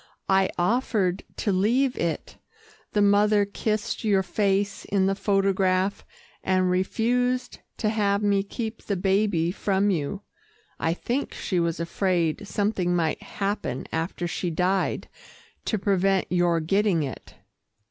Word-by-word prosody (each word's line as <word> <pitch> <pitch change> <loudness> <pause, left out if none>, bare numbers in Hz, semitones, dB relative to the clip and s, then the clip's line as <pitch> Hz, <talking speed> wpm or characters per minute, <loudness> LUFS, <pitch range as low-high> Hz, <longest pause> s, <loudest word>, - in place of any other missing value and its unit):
"I 190 0 +4
offered 195 -1 +1 0.2
to 205 - 0
leave 240 +8 +2
it. 165 -1 -3 0.6
The 205 - +3
mother 205 0 +4
kissed 215 +2 -2
your 200 -3 +3
face 200 +1 0
in 195 -1 +1
the 195 - +2
photograph, 195 -1 +1 0.4
and 185 -1 +2
refused 245 +7 0 0.2
to 215 - 0
have 205 -1 +1
me 200 -1 +3
keep 220 +2 -5
the 200 - -2
baby 190 -3 +1
from 200 +1 +1
you. 180 +4 -2 0.6
I 165 +1 0
think 250 +9 -3
she 180 - -1
was 170 -1 0
afraid 175 +1 0
something 195 -4 0
might 165 -3 0
happen 200 -9 -3
after 165 +2 -2
she 175 +1 -2
died 185 +3 0 0.6
to 220 - 0
prevent 195 -1 +2
your 175 -2 +2
getting 195 0 +2
it." 135 - -7
195 Hz, 130 wpm, -25 LUFS, 180-210 Hz, 0.6 s, I